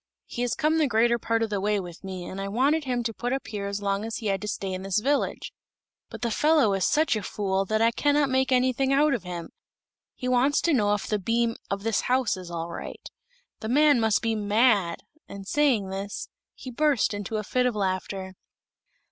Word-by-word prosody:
"He 240 - -6
has 245 -1 0
come 315 +1 +1
the 305 - +3
greater 235 0 +2
part 230 0 0
of 220 - -3
the 200 -2 -1
way 210 +1 +1
with 175 -2 -9
me, 185 -2 -6
and 195 +2 -6
I 195 - -3
wanted 280 +9 +1
him 245 -2 -1
to 225 -1 -2
put 245 +3 -3
up 270 - -3
here 205 -2 -4
as 200 0 -4
long 200 +1 0
as 225 0 -4
he 225 - -8
had 195 -2 0
to 210 - -5
stay 195 -2 -3
in 185 - -4
this 195 +1 -1
village. 280 +6 -1 0.6
But 225 0 -9
the 235 - 0
fellow 295 -4 +3
is 195 -2 +1
such 310 -4 +2
a 215 - -2
fool 195 -1 -1
that 215 +3 +1
I 230 - +4
cannot 290 +3 +2
make 265 0 +1
anything 255 +1 +2
out 285 +1 +4
of 240 - -1
him. 175 -2 -7 0.6
He 250 - -5
wants 255 +4 +3
to 335 - +2
know 210 -5 +3
if 205 - -5
the 210 - -1
beam 230 +3 0
of 195 0 -3
this 225 -2 +1
house 255 -3 +1
is 185 -2 -9
all 170 0 -4
right. - - -8 0.5
The 220 - -5
man 290 0 +5
must 220 -1 +2
be 225 -1 +1
mad!" 205 -4 +2 0.3
and 195 -1 -9
saying 255 -10 +2
this, 195 +1 -5 0.3
he 255 - -9
burst 280 -5 +2
into 205 +1 -4
a 215 - -2
fit 250 +4 +1
of 245 - -2
laughter. 190 -1 -3
220 Hz, 225 wpm, -26 LUFS, 195-255 Hz, 0.6 s, man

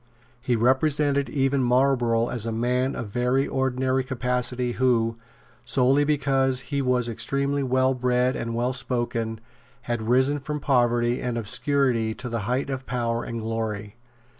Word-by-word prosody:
He 125 -1 0
represented 140 +4 +2
even 135 -1 +1
Marlborough 125 -2 +2
as 115 -2 -2
a - - -1
man 125 +4 0
of 115 - -5
very 125 +5 +1
ordinary 130 0 0
capacity, 125 -1 -1
who, 115 -2 +1 0.5
solely 135 +2 +3
because 135 -3 +1
he 140 +3 -2
was 125 -2 +1
extremely 140 +5 -1
well 130 0 +2
bred 125 0 +1
and 115 0 -3
well 120 +2 0
spoken, 120 -3 -2 0.4
had 120 -2 -3
risen 130 +4 +3
from 150 +2 -4
poverty 120 -3 +2
and 125 -2 -2
obscurity 115 0 0
to 125 - -6
the 115 0 -2
height 135 +3 -1
of 130 -1 -5
power 120 -2 -1
and 115 -1 -5
glory. 110 -2 -4
125 Hz, 145 wpm, -25 LUFS, 120-135 Hz, 0.5 s, solely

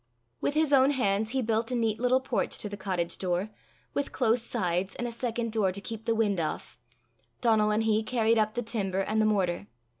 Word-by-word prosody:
With 290 - 0
his 305 -2 +2
own 270 0 +6
hands 215 -6 +1
he 260 +2 -1
built 225 0 0
a 250 - -1
neat 225 -2 0
little 250 +2 +3
porch 260 -3 -1
to - - -3
the 205 - -6
cottage 185 -3 -3
door, 185 +3 -1 0.4
with 285 - -2
close 240 -2 +2
sides 190 -5 -1
and 245 - -3
a - - -4
second 235 -1 -2
door 210 -4 +2
to 195 - -4
keep 225 +2 -7
the 230 - +1
wind 210 -4 +1
off: 125 -7 -4 0.6
Donal 220 -3 +3
and 215 +1 +1
he 220 -1 +2
carried 225 0 +2
up 215 0 +1
the 240 - -1
timber 195 -4 -1
and 215 +3 +1
the 215 - +3
mortar. 195 -2 0
220 Hz, 215 wpm, -28 LUFS, 200-235 Hz, 0.6 s, own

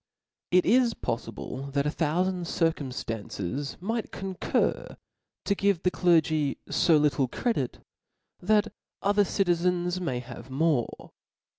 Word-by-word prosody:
It 180 0 +4
is 240 +1 +4
poflible 130 +3 -5
that 140 0 +1
a 150 - +1
thouTand 175 +3 0
circumftances 130 - -2
might 225 +4 -3
concur 190 -2 -1 0.5
to 200 - +2
give 195 -3 +1
the 180 - +3
clergy 155 -5 +2
fo 155 +1 +3
littJe 140 -4 +1
credit, 220 - -2 0.5
that 215 +3 +2 0.3
other 205 +1 +4
citizens 180 -1 +1
may 135 -8 -1
have 125 +1 -9
more. 140 -2 0
165 Hz, 115 wpm, -27 LUFS, 140-190 Hz, 0.5 s, It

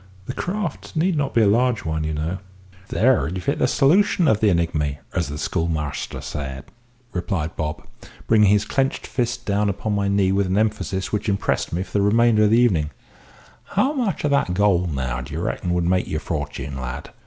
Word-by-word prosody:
The 130 - -4
craft 185 -2 -4
need 170 +3 +2
not 145 -2 -1
be 115 - +5
a - - +4
large 120 +1 +2
one, 80 -1 -1
you 80 0 -2
know 80 +5 -2 0.2
" 95 0 -25
"There 125 +4 +3
you've 90 +1 -5
hit - - 0
the - - +3
solution 175 +4 +3
of 110 -5 +3
the 110 - +4
enigmy, 80 -5 0 0.2
as 85 - 0
the 70 +1 -5
schoolmaster 80 -2 -2
said," 70 -2 -5 0.5
replied 85 -3 -2
Bob, 75 0 -4 0.4
bringing 105 -3 +5
his 105 0 +3
clenched 135 0 -1
fist 120 -1 -2
down 100 0 +1
upon 100 +2 -2
my 100 -1 0
knee 100 -1 +2
with 100 0 +1
an 95 +2 0
emphasis 105 -3 -1
which 105 +1 -1
impressed 100 0 0
me 85 +3 -1
for - - -15
the 100 - +2
remainder 110 +1 +4
of - - +3
the 115 - +4
evening: 90 -12 +3 0.9
"How 260 +9 +3
much 240 - -1
of 150 - +1
that 140 -11 +1
gold 90 -3 +2
now 65 -2 -2
do - - -7
you - - -2
reckon 90 - -2
would 90 - +1
make 90 +1 +1
your 80 - -2
fortune, 70 -4 -4
lad? 65 0 -6
100 Hz, 205 wpm, -22 LUFS, 80-115 Hz, 0.9 s, be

